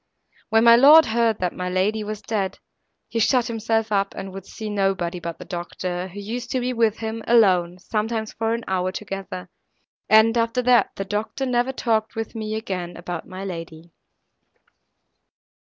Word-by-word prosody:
When 225 Hz, 0 st, +4 dB
my 235 Hz, 0 st, +8 dB
lord 295 Hz, +6 st, +8 dB
heard 225 Hz, -1 st, +1 dB
that 180 Hz, -1 st, 0 dB
my 180 Hz, 0 st, -4 dB
lady 200 Hz, +4 st, 0 dB
was 210 Hz, 0 st, -6 dB
dead, 200 Hz, -3 st, -2 dB, 0.5 s
he 230 Hz, -, -2 dB
shut 245 Hz, +2 st, +3 dB
himself 225 Hz, -1 st, -1 dB
up, 200 Hz, -1 st, 0 dB
and 195 Hz, -1 st, -6 dB
would 195 Hz, 0 st, -9 dB
see 220 Hz, -, -7 dB
nobody 195 Hz, -4 st, -1 dB
but 170 Hz, -1 st, -6 dB
the -, -, -10 dB
doctor, 175 Hz, 0 st, -4 dB
who 190 Hz, +2 st, -9 dB
used 235 Hz, +4 st, -5 dB
to 260 Hz, -, +1 dB
be 250 Hz, +1 st, -1 dB
with 230 Hz, -2 st, +2 dB
him 225 Hz, 0 st, -4 dB
alone, 185 Hz, -7 st, +4 dB
sometimes 220 Hz, +3 st, -3 dB
for 225 Hz, 0 st, -1 dB
an 235 Hz, -, -6 dB
hour 185 Hz, -1 st, 0 dB
together; 195 Hz, -2 st, -6 dB, 0.6 s
and, 220 Hz, +1 st, +6 dB
after 230 Hz, +2 st, 0 dB
that, 245 Hz, -1 st, +4 dB
the 195 Hz, -, -4 dB
doctor 210 Hz, +7 st, -3 dB
never 250 Hz, 0 st, +1 dB
talked 225 Hz, -4 st, -1 dB
with 225 Hz, -1 st, -4 dB
me 215 Hz, -1 st, -4 dB
again 180 Hz, -5 st, -4 dB
about 175 Hz, -1 st, -6 dB
my 185 Hz, +1 st, -7 dB
lady. 165 Hz, -2 st, -8 dB
215 Hz, 170 wpm, -23 LUFS, 185-230 Hz, 0.6 s, my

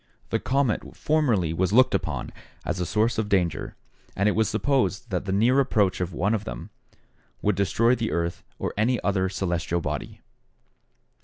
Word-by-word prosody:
The -, -, +1 dB
comet 135 Hz, -3 st, +1 dB, 0.2 s
formerly 120 Hz, -, +1 dB
was 90 Hz, +2 st, 0 dB
looked 130 Hz, +4 st, +5 dB
upon -, -, -2 dB, 0.3 s
as 90 Hz, +2 st, -2 dB
a 90 Hz, -, -1 dB
source 110 Hz, +2 st, +1 dB
of 105 Hz, -2 st, -1 dB
danger, 85 Hz, -7 st, 0 dB, 0.4 s
and 100 Hz, -, +1 dB
it -, -, +4 dB
was 110 Hz, 0 st, +1 dB
supposed 110 Hz, -2 st, 0 dB
that 90 Hz, 0 st, -1 dB
the 95 Hz, -, -2 dB
near 115 Hz, +7 st, +3 dB
approach 105 Hz, -9 st, +2 dB
of 90 Hz, 0 st, -2 dB
one 95 Hz, +5 st, 0 dB
of 110 Hz, -2 st, -1 dB
them -, -, -7 dB, 0.7 s
would 105 Hz, -, +3 dB
destroy 110 Hz, +5 st, +2 dB
the 115 Hz, -3 st, -1 dB
earth 85 Hz, 0 st, -2 dB, 0.2 s
or -, -, -3 dB
any 115 Hz, +3 st, +1 dB
other 95 Hz, -2 st, +1 dB
celestial 85 Hz, -2 st, -1 dB
body. 75 Hz, -3 st, -5 dB
100 Hz, 170 wpm, -25 LUFS, 90-115 Hz, 0.7 s, looked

